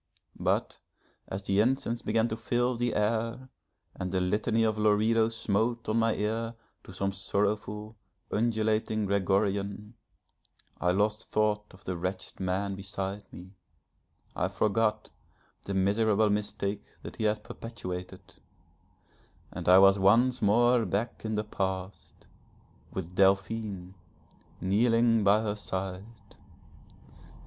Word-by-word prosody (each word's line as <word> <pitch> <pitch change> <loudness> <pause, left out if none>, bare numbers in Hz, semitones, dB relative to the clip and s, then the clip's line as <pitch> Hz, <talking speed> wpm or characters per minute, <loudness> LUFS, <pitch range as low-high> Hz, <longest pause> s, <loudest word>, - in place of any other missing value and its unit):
But - - 0 0.5
as 95 +1 -5
the 95 +1 +1
incense 120 0 +1
began 115 +2 +1
to 110 - -2
fill 120 +2 0
the 120 0 -1
air, 115 +4 -1 0.4
and 90 -1 -4
the 95 - +1
Litany 105 +4 +1
of 110 -1 +1
Loreto 110 +2 +3
smote 115 +1 -1
on 110 +1 +1
my 115 -1 +2
ear 115 +2 -2 0.3
to - - -12
some 95 +1 -2
sorrowful, 105 +2 -2 0.4
undulating 110 -1 +1
Gregorian, 100 +2 0 0.9
I 90 - +1
lost 105 +4 0
thought 105 -1 +1
of 95 0 -17
the 90 - -3
wretched 90 +2 -4
man 95 +1 -1
beside 95 0 -5
me; 90 +1 -11 0.8
I - - 0
forgot 110 0 0 0.5
the 100 - -3
miserable 105 +2 +3
mistake 105 -1 -2 0.2
that - - -9
he 110 - -1
had 105 0 0
perpetuated, 90 -6 -7 1.3
and - - -3
I 90 - +9
was 95 +1 +6
once 120 +6 +4
more 120 +3 +4
back 110 +3 -2
in 110 -1 -2
the 105 - 0
past 95 -2 -5 0.7
with 90 -2 -5
Delphine 95 0 +1 0.7
kneeling 115 +4 +3
by 100 +2 +4
her 105 -1 -1
side. 100 +2 -6
105 Hz, 120 wpm, -29 LUFS, 95-115 Hz, 1.3 s, I